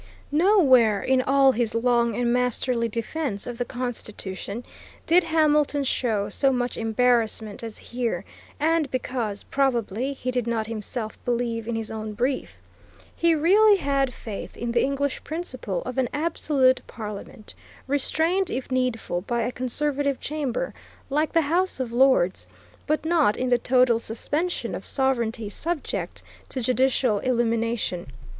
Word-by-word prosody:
Nowhere 285 - +5
in 260 0 +3
all 270 +1 +5
his 235 -2 -1
long 235 -1 +2
and 240 0 +1
masterly 250 -1 +1
defence 230 0 -3
of 245 -1 -6
the 245 - 0
Constitution 225 -4 -5 0.4
did 350 +2 +5
Hamilton 300 -3 +2
show 225 -6 0
so 275 -1 +2
much 245 -1 -1
embarrassment 225 -2 +1
as 225 -2 -7
here, 240 -1 -3 0.3
and 315 -1 +2
because, 245 -5 -3
probably, 255 -2 0
he 255 -2 -3
did 250 -2 -1
not 225 -2 0
himself 220 0 -5
believe 235 -2 -1
in 235 - -2
his 225 -1 -3
own 215 -1 -5
brief. 255 +5 -2 0.6
He 335 -1 +3
really 400 +7 +5
had 275 -5 +1
faith 220 -4 -8
in 235 0 -3
the 235 - +2
English 280 0 -1
principle 255 - -4
of 255 +1 -3
an 255 - +1
absolute 290 -5 +2
parliament, 210 -1 -8 0.3
restrained, 320 +7 +1
if 260 +1 -4
needful, 250 -8 -1
by 235 +4 -1
a 245 - -1
conservative 280 +2 -1
chamber, 300 - -2 0.4
like 300 +2 +1
the 330 - +4
House 345 +2 0
of 245 -3 -3
Lords, 250 -8 +3 0.4
but 305 +1 0
not 315 -10 +3
in 255 - -1
the 245 -1 +3
total 250 -2 +3
suspension 295 +10 -3
of - - -5
sovereignty 235 -5 0
subject 320 - -4 0.3
to 260 - -4
judicial 255 -2 +2
illumination. 230 -6 0
250 Hz, 140 wpm, -25 LUFS, 230-285 Hz, 0.6 s, Nowhere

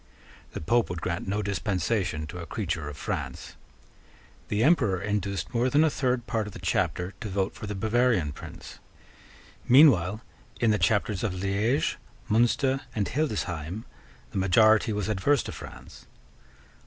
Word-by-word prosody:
The - - -5
Pope 115 +9 +2
would 90 -1 -4
grant 85 +1 -3
no 105 +2 -1
dispensation 95 -4 -1
to 90 +4 -8
a 85 - -7
creature 85 -8 -3
of 75 - -9
France. - - -5 0.9
The 105 +2 0
Emperor 120 - +3
induced 100 +1 -2
more 120 +2 +2
than 145 +4 +4
a 160 - +3
third 125 -3 0
part 110 -3 -1
of 105 - -9
the - - -9
Chapter 90 +1 -1
to 110 - -4
vote 95 0 -1
for 110 -1 -8
the 105 - -4
Bavarian 110 -5 +1
prince. - - -10 0.9
Meanwhile, 115 - +6 0.4
in 115 - +3
the 105 - +1
Chapters 100 +2 +1
of 100 -5 -1
Liege, 100 +8 0 0.3
Munster, 130 +4 +2
and 105 -3 0
Hildesheim, 100 - -2 0.5
the - - -2
majority 110 +4 +4
was 105 -1 -2
adverse 110 +7 +2
to - - -6
France. - - -11
105 Hz, 155 wpm, -27 LUFS, 90-115 Hz, 0.9 s, Meanwhile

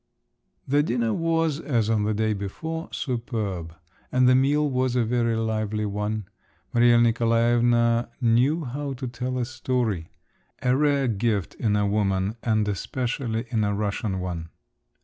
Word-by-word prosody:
The 145 +2 +3
dinner 120 -5 0
was, 165 -1 0
as 120 -9 0
on 110 -2 +1
the 110 - +1
day 110 0 +1
before, 160 - -5
superb, 110 - -3 0.4
and 125 0 +4
the 130 - +6
meal 145 +3 +3
was 130 -2 0
a 120 -2 +2
very 115 0 +1
lively 110 -1 -1
one. 105 +1 -2 0.5
Maria 120 0 +5
Nikolaevna 120 0 +3
knew 130 +7 +2
how 140 +3 -4
to 130 0 -5
tell 125 +1 -3
a 125 - 0
story… 120 -8 -2 0.5
a 125 0 +3
rare 140 -1 +2
gift 105 -4 0
in 105 -3 0
a 105 0 +2
woman, 100 0 0
and 110 -2 +1
especially 115 +3 -2
in 110 -3 +1
a 100 0 0
Russian 100 -1 -2
one! 85 -3 -4
115 Hz, 150 wpm, -25 LUFS, 105-130 Hz, 0.5 s, the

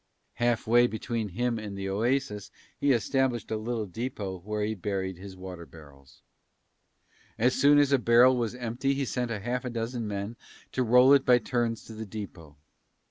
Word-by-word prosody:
Half 120 -1 +1
way 120 +2 +5
between 110 -1 -3
him 120 +4 -1
and 105 -2 -7
the 95 0 -4
oasis 105 0 -1 0.3
he 140 - +1
established 125 0 0
a - - +1
little 110 0 -3
depot 100 -2 -5
where 105 +3 -3
he 110 +1 -1
buried 95 -2 -3
his 95 -1 -10
water 90 -2 -9
barrels. 70 -4 -17 1.1
As 125 +3 +3
soon 145 +1 +5
as 145 -1 +4
a 140 - +4
barrel 120 +2 +5
was 120 -1 -2
empty 125 +3 -2
he 140 0 -1
sent 125 -1 -2
half 120 +4 -3
a 125 - -3
dozen 115 0 -3
men 100 +3 -4 0.3
to 130 - -1
roll 125 +3 +6
it 140 -1 +5
by 125 -2 +5
turns 120 -1 -2
to 110 - -11
the 110 0 -7
depot. 90 -8 -9
115 Hz, 180 wpm, -28 LUFS, 100-125 Hz, 1.1 s, roll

